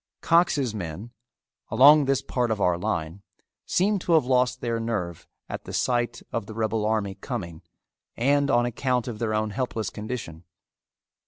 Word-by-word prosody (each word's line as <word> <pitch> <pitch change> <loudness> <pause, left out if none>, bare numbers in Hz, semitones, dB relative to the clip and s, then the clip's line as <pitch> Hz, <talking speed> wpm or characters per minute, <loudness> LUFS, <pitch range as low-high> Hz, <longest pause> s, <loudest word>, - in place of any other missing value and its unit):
Cox's 160 -8 +2
men, 100 +3 -6 0.6
along 145 +2 +7
this 135 0 +1
part 125 -2 -1
of 110 -2 -1
our 90 -3 +3
line, 85 +1 -3 0.5
seem 200 +3 +2
to 175 - 0
have 155 -5 +4
lost 125 -1 +2
their 115 -2 -2
nerve 105 -8 -3 0.2
at - - -6
the - - -8
sight 120 -1 0
of 115 -3 -3
the 110 - -8
rebel 110 -1 0
army 105 -3 0
coming 90 -8 -6 0.6
and 140 +3 +2
on 120 0 +3
account 125 +1 -1
of 115 -3 -5
their 110 -2 -1
own 110 0 -1
helpless 115 -2 -3
condition. 105 -7 -6
115 Hz, 160 wpm, -25 LUFS, 105-130 Hz, 0.6 s, along